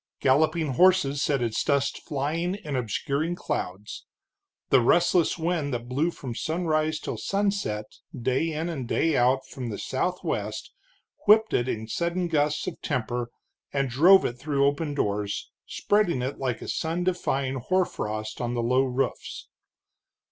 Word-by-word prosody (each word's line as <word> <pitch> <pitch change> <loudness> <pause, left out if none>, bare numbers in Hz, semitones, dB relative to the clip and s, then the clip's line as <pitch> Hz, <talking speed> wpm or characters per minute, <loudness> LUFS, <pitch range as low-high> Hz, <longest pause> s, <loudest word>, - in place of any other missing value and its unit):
Galloping 155 +4 +2
horses 155 -1 +3
set 140 -4 +1
its 115 -2 -1
dust 140 -1 +1
flying 160 +5 -1
in 155 -9 -5
obscuring 140 - -1
clouds; 100 - -5 0.6
the 135 - +6
restless 175 +7 +3
wind 165 -3 -1
that 120 0 -5
blew 140 +7 +1
from 130 -7 -6
sunrise 155 +1 0
till - - -5
sunset 200 - -1 0.3
day 130 +7 0
in 160 +2 -2
and 140 -8 -4
day 160 +6 +1
out 130 +2 +3
from 125 -3 -6
the 105 - -4
southwest, 180 +7 -3 0.6
whipped 220 +1 +6
it 120 - +1
in 110 -2 -3
sudden 170 +7 -1
gusts 150 -1 +1
of - - -6
temper, 120 -3 -2 0.4
and 135 -2 -1
drove 180 +10 +6
it 120 0 -3
through 140 0 +1
open 145 +1 0
doors, 100 -5 -2 0.2
spreading 190 -11 +1
it 130 +2 -4
like 130 -4 -2
a - - -8
sun 165 +2 -1
defying 140 -7 -1
hoarfrost 110 -10 -2
on 120 0 -2
the 120 - -1
low 125 +3 +3
roofs. 130 0 -3
140 Hz, 150 wpm, -26 LUFS, 125-170 Hz, 0.6 s, the